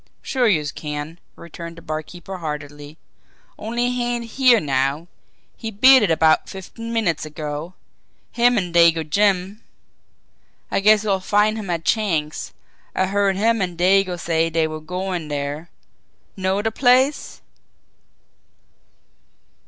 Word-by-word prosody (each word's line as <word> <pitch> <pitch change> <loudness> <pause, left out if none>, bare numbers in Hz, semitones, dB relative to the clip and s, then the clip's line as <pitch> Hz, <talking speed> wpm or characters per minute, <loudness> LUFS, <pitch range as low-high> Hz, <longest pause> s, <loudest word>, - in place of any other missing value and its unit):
"Sure, 255 -3 +1
youse 155 -8 +1
can!" 150 +2 -6 0.2
returned 170 0 -10
the 165 - -12
barkeeper 160 +4 -6
heartily. 150 -1 -7 0.6
"Only 240 +3 -1
he 250 -1 -2
ain't 235 -1 -5
here 255 -3 +5
now. 140 +1 -1 0.5
He 225 - -6
beat 255 +5 +6
it 205 - +1
about 160 -1 +3
fifteen 230 +4 -8
minutes 210 -9 0
ago, 155 +3 -6 0.6
him 245 0 +3
an' 180 -4 -2
Dago 165 -2 +4
Jim. 200 +3 +1 1.1
I - - +1
guess 215 +1 +4
youse'll 195 -3 0
find 210 +3 +2
him 215 -4 -6
at 165 -2 -2
Chang's, 165 -9 -1 0.4
I 190 - +2
heard 200 0 +1
him 225 +2 +1
an' 180 -2 -3
Dago 185 0 +2
say 165 -1 0
dey 165 -1 +1
was 155 0 -5
goin' 180 -2 -3
dere. 145 +3 -4 0.7
Know 190 +1 -1
de 225 - 0
place?" 260 +4 +2
180 Hz, 130 wpm, -21 LUFS, 155-215 Hz, 1.1 s, beat